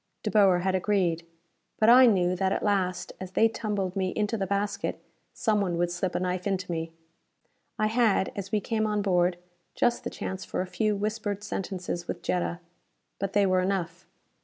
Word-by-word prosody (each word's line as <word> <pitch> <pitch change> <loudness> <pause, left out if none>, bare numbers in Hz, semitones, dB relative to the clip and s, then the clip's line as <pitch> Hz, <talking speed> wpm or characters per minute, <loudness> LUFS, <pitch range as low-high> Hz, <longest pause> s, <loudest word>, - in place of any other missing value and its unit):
De - - -1
Boer 195 -4 +5
had 190 +1 0
agreed. 180 -3 0 0.5
But 215 - +3
I 250 +2 +9
knew 180 -4 +3
that 190 +1 0
at - - -1
last, 185 -3 0
as 185 0 -7
they 225 - +5
tumbled 205 -4 -3
me 190 -1 0
into 210 +1 0
the 195 -3 -2
basket, 200 +1 -2 0.3
someone 200 -6 0
would 175 0 0
slip 175 +1 -2
a - - +1
knife 180 +1 -2
into 190 -2 -2
me! 165 -1 -3 0.9
I 215 - +1
had, 220 -3 +2
as 195 0 -5
we 215 -2 +1
came 220 0 0
on 210 -1 0
board, 180 -2 +2 0.4
just 240 - +1
the - - -3
chance 190 0 -5
for - - -3
a - - -2
few 210 +3 0
whispered 205 0 -3
sentences 180 -3 -4
with - - -5
Jetta. 175 -1 -1 0.6
But 195 0 -3
they 205 -1 +4
were 185 -1 +3
enough! 185 -2 -2
195 Hz, 185 wpm, -27 LUFS, 180-210 Hz, 0.9 s, I